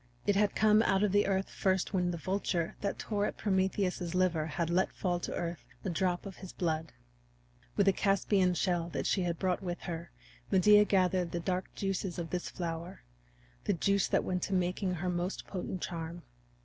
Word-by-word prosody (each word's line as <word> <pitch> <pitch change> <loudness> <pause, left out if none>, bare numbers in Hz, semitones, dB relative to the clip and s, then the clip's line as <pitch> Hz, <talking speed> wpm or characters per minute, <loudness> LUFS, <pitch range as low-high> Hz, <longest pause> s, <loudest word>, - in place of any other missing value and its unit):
It 205 - +3
had 205 0 +2
come 215 0 +5
out 195 -3 +2
of 210 - +2
the 205 0 +3
earth 195 0 +1
first 190 +1 0
when 180 -2 +2
the 175 - -2
vulture 175 -1 -1
that 200 - -1
tore 205 -1 -1
at - - -5
Prometheus's 190 -3 0
liver 175 -4 +2
had 170 +2 -2
let 185 +2 +2
fall 175 -2 -1
to - - -4
earth 170 -2 -3 0.2
a 190 - 0
drop 180 +2 0
of 195 -2 -8
his 190 - -9
blood. 160 -2 -1 0.9
With 200 - +3
a 195 - +6
Caspian 195 -1 +2
shell 175 -1 0
that - - -2
she 195 - +2
had 170 -2 -1
brought 185 +1 0
with 175 -2 -4
her 170 -1 -5 0.4
Medea 210 +2 +6
gathered 185 -3 +2
the 170 - 0
dark 180 +2 -2
juice 195 -2 -2
of 170 -2 -4
this 180 -1 -2
flower 170 0 -5 0.6
the - - +2
juice 200 +3 +2
that - - +2
went 180 -1 -1
to 195 - -1
make 180 0 0
her 180 -3 -1
most 175 +2 -2
potent 185 -1 -4
charm. 170 0 -5
185 Hz, 195 wpm, -32 LUFS, 175-195 Hz, 0.9 s, a